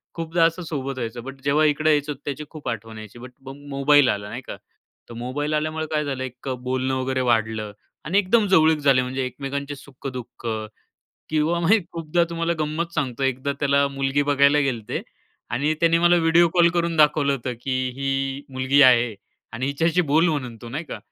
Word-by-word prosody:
खूपदा 165 0 0
असं 165 +2 0
सोबत 135 -3 -4
व्हायचं. 120 -1 -5
बट 135 +1 -9
जेव्हा 150 +2 +3
इकडं 155 +1 +2
यायचो 150 0 +2
त्याची 145 +1 -6
खूप 150 -5 -7
आठवण 115 -1 -6
यायची. 110 +2 -11
बट 125 +1 -10
मग 135 +1 -8
मोबाईल 140 0 +4
आला 100 0 -2
नाही 125 - -6
का? - - -6 0.5
तर - - -9
मोबाईल 145 +5 -3
आल्यामुळं 155 +1 -1
काय 150 -1 +1
झालं 135 -2 -3
एक 125 0 -9
अ, 130 - 0
बोलणं 130 +1 -2
वगैरे 130 0 -1
वाढलं 110 -2 0 0.3
आणि 180 +5 +1
एकदम 205 +3 +3
जवळीक 160 -4 +5
झाले 135 -3 +4
म्हणजे 130 +1 -3
एकमेकांचे 140 +3 -5
सुख-दुःख 130 -3 -9 0.8
किंवा 155 +2 +1
मी 195 +7 +4
खूपदा 165 +1 0
तुम्हाला 170 0 -1
गंमत 155 +3 -2
सांगतो. 135 -4 -2
एकदा 135 +1 0
त्याला 140 0 +3
मुलगी 135 +1 0
बघायला 140 0 +4
गेलते 120 -7 -2 0.5
आणि 145 +7 0
त्याने 165 0 +4
मला 175 +1 +4
व्हिडिओ 170 +1 +4
कॉल 175 -1 +6
करून 170 -1 0
दाखवलं 150 -2 +4
होतं, 130 -2 -3
की 135 - -4 0.3
"ही 135 0 -2
मुलगी 130 +2 +2
आहे 120 -4 +5 0.4
आणि 125 +3 -3
हिच्याशी 165 +5 +1
बोल 160 +4 +4
म्हणून 130 -7 -3
तू 120 - -8
नाही 150 +7 -5
का?" 115 - -7
140 Hz, 185 wpm, -23 LUFS, 130-155 Hz, 0.8 s, कॉल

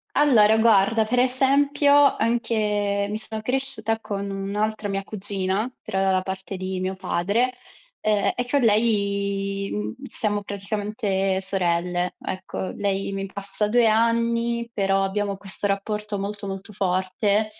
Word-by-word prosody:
Allora, 220 -7 +5
guarda, 220 0 +4
per 245 +3 +1
esempio, 275 +3 +3 0.2
anche 210 -3 0
mi 210 - -3
sono 220 0 -6
cresciuta 245 -3 0
con 200 -2 -4
un'altra 205 +2 -2
mia 195 0 -2
cugina, 200 +2 -1
però 190 - -2
dalla 190 -1 +2
parte 190 +1 -5
di 185 0 -4
mio 185 +1 -2
padre, 200 +8 0 0.5
uhm, 210 -1 +2
e 245 - -2
con 285 - +3
lei, 200 -3 +1
uhm, 210 +2 -3
siamo 210 -6 -2
praticamente 200 -1 -2
sorelle, 180 -1 -1
ecco. 185 0 -5
Lei 195 -1 -1
mi 195 0 -3
passa 200 +1 -3
2 235 +2 +4
anni, 230 +1 +1
però 195 -2 +1
abbiamo 200 +1 -1
questo 200 +1 -3
rapporto 210 +1 -2
molto 200 0 -4
molto 195 +2 -6
forte. 195 +2 0
205 Hz, 135 wpm, -24 LUFS, 195-220 Hz, 0.5 s, Allora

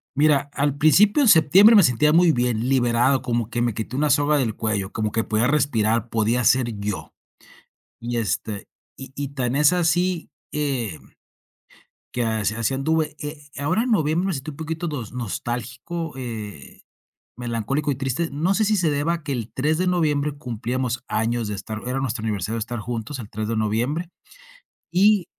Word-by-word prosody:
Mira, 145 -1 +3
al 145 0 0
principio 200 - +5
de 245 - +5
septiembre 190 +7 +7
me 205 - +8
sentía 150 +3 +3
muy 170 0 +6
bien, 120 -2 0
liberado, 125 0 +3
como 120 -3 -1
que 120 - -2
me 120 -2 +1
quité 110 +4 -5
una 150 +2 +1
soga 145 +1 +3
del 115 -5 0
cuello, 105 -3 -2
como 110 -2 -2
que 115 - 0
podía 110 +3 +1
respirar, 115 -6 +1
podía 115 +2 +1
ser 120 -1 +3
yo, 100 -1 -4 0.9
y, 120 +1 -3
este, 105 -1 -2 0.3
y 135 0 -10
y 140 0 -4
tan 130 -1 -2
es 150 +3 +5
así, 175 0 +1 0.2
eh, 130 - -2 1.1
que 120 -1 -1
as 110 -2 0
así 115 +4 -1
anduve, 155 +2 0
eh, 150 -1 -8
ahora 175 +11 +1
en 255 - -2
noviembre 160 0 +1
me 195 - 0
sentí 140 +2 -5
un 140 - -11
poquito 160 +1 -4
nos 125 -9 -5
nostálgico, 125 - -4
eh, 110 - -7 0.5
melancólico 120 +5 -2
y - - -1
triste. 135 +5 -2
No 165 +7 +1
sé 215 - +2
si 215 0 +2
se 175 -4 +2
deba 145 +4 0
a 165 - -9
que 145 - -4
el 120 -2 -4
3 150 +4 0
de 185 +1 0
noviembre 150 -5 +1
cumplíamos 125 0 -3
años 115 +1 0
de 105 - -3
estar 110 +2 -6
era 130 +1 -1
nuestro 125 -4 -2
aniversario 110 +1 -2
de - - -2
estar 120 +1 -4
juntos 120 +4 -5
el 110 -4 -8
3 110 +1 -4
de 115 - -1
noviembre, 120 +11 -1 0.8
y 200 0 +4
130 Hz, 180 wpm, -23 LUFS, 115-155 Hz, 1.1 s, me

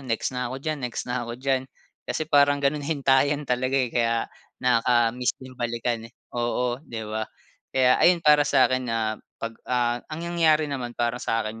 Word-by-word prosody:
next 125 -1 -2
na 125 -1 -2
ako 130 - -5
diyan, 150 +2 -3
next 125 -2 -4
na 125 0 -2
ako 120 - -5
diyan." 130 0 -1 0.4
Kasi 155 - -1
parang 145 -1 +4
gano'n, 140 +1 0
hintayan 140 0 +2
talaga, 130 +1 0
eh, 125 -3 0
kaya 115 -1 +1 0.4
nakakamiss 120 0 +2
din 130 0 -12
balikan, 120 -2 -3
eh. - - -28 0.2
Oo, 120 +1 -1
'di 115 -7 -7
ba? 110 +1 -4 0.4
Kaya 130 -1 +3
ayun, 175 -2 +4
para 150 0 +7
sa 135 -2 +5
'kin 130 0 0
na 110 -1 -1 0.2
'pag 115 0 -5 0.2
ah, 120 -1 +1
ang 160 +2 -5
nangyari 160 -3 +3
naman 130 -5 -5
para 120 +1 -1
sa 115 0 0
'kin 110 +1 -6
125 Hz, 185 wpm, -25 LUFS, 120-140 Hz, 0.4 s, para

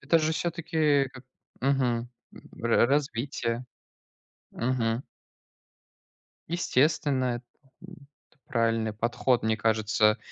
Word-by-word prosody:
Это 155 +4 +3
же, 155 0 +1
всё-таки, 155 -4 +1
как 130 -1 -12 0.4
мгм, 125 -3 +1 0.5
ра 115 0 +4
развитие. 130 -3 -1 0.9
Мгм. 120 -1 -1 1.5
Естественно 145 -4 +1
это 120 - -11 0.4
м, 170 -7 -14 0.2
это 155 - -31
правильный 115 -1 +1
подход, 120 +2 +1
мне 110 0 +1
кажется, 110 0 +2
125 Hz, 95 wpm, -28 LUFS, 115-145 Hz, 1.5 s, ра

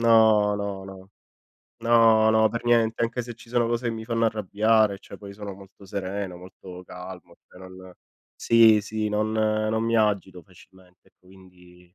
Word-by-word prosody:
no, 110 -3 +4
no, 100 -1 -5
no. 95 0 -12 0.7
No, 115 -2 +4
no, 110 0 +3
per 115 +2 -6
niente, 115 -1 +1
anche 120 +1 -3
se 120 0 -9
ci 120 0 -17
sono 120 -1 0
cose 120 +1 -2
che 115 - -1
mi 110 - -7
fanno 115 0 -1
arrabbiare, 110 0 +1
cioè, - - -13
poi 100 -1 -11
sono 100 0 -8
molto 100 +1 -16
sereno, 95 -1 -5
molto 90 0 -12
calmo, 90 0 -11
e - - -20
non 95 0 -13 0.4
sì, 115 -2 +4
sì, 110 +1 -4
non 105 +1 -1
non 110 0 0
mi 115 0 0
agito 100 -5 -1
facilmente, 95 +1 -21
e - - -27
quindi 90 -1 -20
105 Hz, 170 wpm, -24 LUFS, 95-110 Hz, 0.7 s, no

